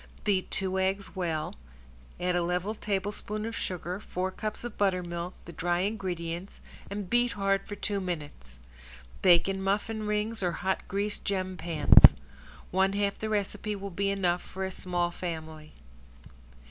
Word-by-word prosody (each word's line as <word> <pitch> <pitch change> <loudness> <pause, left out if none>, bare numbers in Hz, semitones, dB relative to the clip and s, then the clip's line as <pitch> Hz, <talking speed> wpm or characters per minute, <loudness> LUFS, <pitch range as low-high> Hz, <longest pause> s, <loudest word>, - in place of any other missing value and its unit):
Beat 195 -3 +1
two 190 0 +1
eggs 195 +2 -1
well, 165 -4 -1 0.7
add 180 0 +1
a 175 - +3
level 180 +4 0
tablespoon 210 +1 -2
of 225 0 -4
sugar, 180 +1 -3
four 185 -2 -3
cups 215 +3 -5
of 240 -3 -5
buttermilk, 180 -3 -1
the 170 - -8
dry 175 +1 0
ingredients, 185 -3 -3 0.3
and 200 -1 -4
beat 240 +3 +2
hard 195 -1 +1
for 205 - -5
two 200 0 -2
minutes. 150 - -6 0.6
Bake 175 -2 +6
in 195 0 -1
muffin 210 +2 -1
rings 210 +1 0
or 175 -2 +1
hot 190 +3 -1
greased 205 +1 -2
gem 185 -2 -1
pans. 160 - +7 0.6
One 190 +1 +3
half 200 0 0
the 220 - -2
recipe 210 0 -1
will 200 0 -6
be 195 +3 0
enough 180 -3 +1
for 190 0 -5
a 190 - -3
small 175 -2 -1
family. 160 -3 -6
190 Hz, 155 wpm, -29 LUFS, 175-205 Hz, 0.7 s, pans